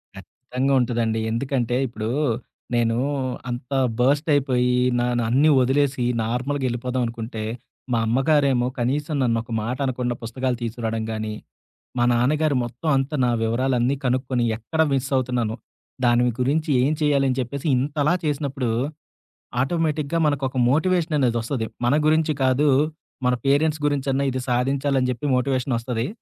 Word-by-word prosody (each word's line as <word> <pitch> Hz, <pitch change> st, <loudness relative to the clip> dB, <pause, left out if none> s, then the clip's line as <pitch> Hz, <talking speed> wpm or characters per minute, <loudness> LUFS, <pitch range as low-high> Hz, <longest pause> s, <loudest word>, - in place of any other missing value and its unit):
ఖచ్చితంగా 125 Hz, +7 st, -3 dB
ఉంటదండి. 115 Hz, -2 st, 0 dB
ఎందుకంటే 120 Hz, 0 st, -1 dB
ఇప్పుడు 110 Hz, -2 st, -4 dB, 0.7 s
నేను 115 Hz, -1 st, +2 dB, 0.5 s
అంత 125 Hz, +3 st, -5 dB, 0.3 s
బర్స్ట్ 145 Hz, +5 st, +2 dB
అయిపోయి 125 Hz, -3 st, +2 dB, 0.2 s
నానన్నీ 120 Hz, +4 st, +2 dB
ఒదిలేసి 135 Hz, 0 st, +1 dB, 0.2 s
నార్మల్‌గా 130 Hz, +4 st, -2 dB
ఎళ్ళిపోదాం 125 Hz, +1 st, -2 dB
అనుకుంటే 115 Hz, -1 st, -5 dB, 0.5 s
మా 115 Hz, -, +2 dB
అమ్మగారేమో 135 Hz, 0 st, +2 dB
కనీసం 145 Hz, +5 st, -1 dB
నన్నొక 115 Hz, -1 st, -1 dB
మాట 125 Hz, +3 st, -3 dB
అనకుండా 125 Hz, -1 st, -1 dB
పుస్తకాలు 125 Hz, +2 st, -2 dB
తీసుకురాడం 115 Hz, -1 st, -3 dB
గాని, 110 Hz, -1 st, -3 dB, 0.7 s
మా 120 Hz, -, +3 dB
నాన్నగారు 145 Hz, +5 st, +2 dB
మొత్తం 120 Hz, +7 st, -5 dB
అంతా 135 Hz, +3 st, -1 dB
నా 125 Hz, -, +2 dB
వివరాలన్నీ 125 Hz, +3 st, +1 dB
కనుక్కొని 125 Hz, -1 st, 0 dB
ఎక్కడ 140 Hz, +8 st, -3 dB
మిస్సవుతున్నాను? 125 Hz, -4 st, 0 dB, 0.5 s
దాని 120 Hz, 0 st, +4 dB, 0.2 s
గురించి 150 Hz, +5 st, +1 dB
ఏం 140 Hz, +4 st, +2 dB
చేయాలని 140 Hz, -3 st, +2 dB
చెప్పేసి 130 Hz, +4 st, -4 dB
ఇంతలా 145 Hz, +5 st, +1 dB
చేసినప్పుడు 140 Hz, -4 st, -1 dB, 0.9 s
ఆటోమేటిక్‌గా 155 Hz, +1 st, 0 dB
మనకోక 135 Hz, -2 st, -1 dB
మోటివేషననేదొస్తది. 140 Hz, -7 st, +1 dB, 0.2 s
మన 125 Hz, -, +3 dB
గురించి 155 Hz, 0 st, +3 dB
కాదు 130 Hz, +3 st, +3 dB, 0.6 s
మన 125 Hz, -, +3 dB
పేరెంట్స్ 150 Hz, +3 st, +2 dB
గురించన్నా 140 Hz, -1 st, 0 dB
ఇది 130 Hz, 0 st, -3 dB
సాధించాలని 135 Hz, +1 st, +1 dB
జెప్పి 125 Hz, +4 st, -4 dB
మోటివేషనొస్తది. 125 Hz, -2 st, -1 dB
130 Hz, 115 wpm, -23 LUFS, 120-140 Hz, 0.9 s, దాని